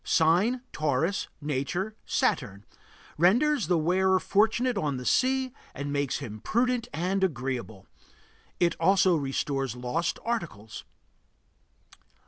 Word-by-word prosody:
Sign: 180 +10 +3
Taurus. 155 +5 0
Nature: 150 +9 -2
Saturn. 100 +1 0 0.5
Renders 240 - +3
the 180 - +3
wearer 185 +4 +2
fortunate 225 +6 +2
on 150 -9 -1
the 125 - -7
sea 260 - +2 0.2
and 145 +1 -4
makes 140 -2 0
him 110 -7 -7
prudent 240 - 0
and 185 +5 -1
agreeable. 125 - -3 0.7
It 170 -1 +3
also 185 +1 +4
restores 135 -3 -2
lost 125 +7 -2
articles. 165 - -4
170 Hz, 110 wpm, -27 LUFS, 135-205 Hz, 0.7 s, also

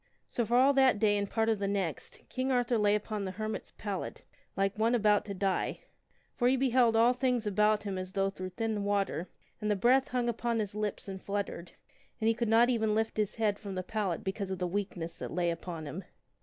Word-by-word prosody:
So 240 - -1
for 240 +3 +2
all 270 +3 +6
that 265 -4 +5
day 205 0 +3
and 200 -1 -1
part 225 0 +1
of 220 -2 +1
the 200 - -1
next, 195 -6 -3
King 260 +1 -2
Arthur 245 -2 +2
lay 205 0 +4
upon 210 0 -3
the 190 -1 -4
her 215 +2 -3
mit's 220 - -5
pallet 200 -3 -5 0.3
like 195 0 +1
one 230 +2 +3
about 210 -2 +3
to 200 -2 -5
die; 190 0 -1 0.5
for 245 - +2
he 260 +1 +4
beheld 250 -3 +3
all 230 +2 +5
things 250 -3 0
about 210 +1 +2
him 195 -3 -3
as 185 0 -6
though 195 0 +1
through 185 -1 -6
thin 215 +2 -2
water, 200 -3 -1 0.3
and 210 - -1
the 210 - +3
breath 250 +7 +4
hung 250 -1 -1
upon 235 0 -1
his 210 -3 -2
lips 210 -1 -3
and 190 -1 -6
flut 200 0 -1
tered, 170 -2 -9 0.5
and 220 - 0
he 225 - +5
could 235 -1 -2
not 230 +2 +6
even 220 -3 +1
lift 220 0 -1
his 210 -2 0
head 210 -3 0
from 200 -3 -6
the 185 - -2
pallet 200 -5 -2
because 195 0 -3
of 190 - -3
the 180 - -1
weakness 180 -3 -3
that - - -4
lay 175 0 +1
upon 165 -1 -6
him. 160 +7 -6
210 Hz, 235 wpm, -31 LUFS, 195-230 Hz, 0.5 s, all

